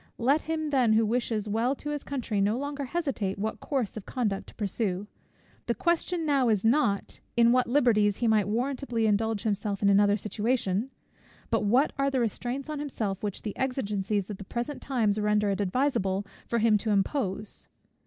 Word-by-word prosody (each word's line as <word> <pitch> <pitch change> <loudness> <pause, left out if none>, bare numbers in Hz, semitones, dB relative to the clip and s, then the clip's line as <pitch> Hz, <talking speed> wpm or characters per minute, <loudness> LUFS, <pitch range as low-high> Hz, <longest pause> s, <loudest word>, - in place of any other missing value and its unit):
Let 275 +6 +3
him 315 -1 -2
then, 250 -5 +4
who 220 +1 +4
wishes 220 -2 -1
well 230 +6 +1
to 295 +2 -5
his 295 -1 -3
country, 235 -7 -2
no 210 +4 +2
longer 285 +1 -3
hesitate 265 - -2
what 215 +2 -3
course 260 -8 -2
of 215 - -8
conduct 215 -7 -2
to - - -14
pursue. 200 -2 -2 0.6
The - - +1
question 340 0 0
now 275 -5 +3
is 215 -2 +1
not, 225 -5 +1 0.2
in 235 0 +6
what 255 0 +3
liberties 220 -6 +3
he 235 - 0
might 215 -3 +3
warrantably 245 +1 -1
indulge 215 0 +1
himself 205 -1 -1
in 200 - +5
another 205 +1 +4
situation? 215 +1 -1 0.6
but - - +1
what 250 +8 +3
are 275 0 +3
the 270 -2 0
restraints 245 +4 -2
on 305 -1 -4
himself 220 -9 -3
which 205 -2 -4
the 210 - -4
exigencies 210 -7 -1
of 205 - -6
the 195 - -8
present 240 +8 -4
times 220 -6 +1
render 210 -1 +2
it 195 - -1
adviseable 200 -3 0 0.2
for 235 - 0
him 220 -2 +4
to 220 - -2
impose? 205 -1 -1
225 Hz, 185 wpm, -28 LUFS, 205-265 Hz, 0.6 s, in